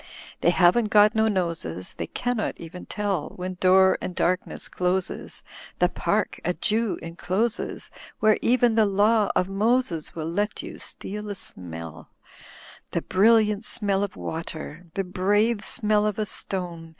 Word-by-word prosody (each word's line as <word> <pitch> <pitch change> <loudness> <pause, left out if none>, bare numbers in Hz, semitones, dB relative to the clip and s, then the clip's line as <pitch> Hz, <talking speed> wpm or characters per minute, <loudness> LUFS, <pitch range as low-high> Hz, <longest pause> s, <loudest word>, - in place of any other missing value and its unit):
''They - - +4
haven't 185 +6 +4
got 210 0 +6
no 220 -1 +3
noses. 165 - -2
They 85 - -5
cannot 245 -3 -2
even 175 +2 -9
tell 200 -7 -2
When 185 0 -5
door 190 0 +5
and 180 - -5
darkness 180 +2 -1
closes 180 0 -2 0.3
The - - +3
park - - -1
a - - 0
Jew 225 -2 0
encloses. 185 +7 -1 0.3
Where 215 -1 +4
even 245 -1 +3
the 220 -1 +4
Law 205 +2 +3
of 185 - +2
Moses 200 -4 0
Will 160 -2 -4
let 205 +6 -2
you - - -8
steal 210 +1 -5
a 205 - -3
smell; 80 - -8 0.8
The - - -2
brilliant 210 +1 +3
smell 200 -4 0
of 200 - -4
water. 165 +1 -6
The 195 - 0
brave 205 +4 +1
smell 210 -3 +2
of 210 - -2
a 215 - 0
stone. 175 -5 -4
195 Hz, 150 wpm, -25 LUFS, 175-215 Hz, 0.8 s, got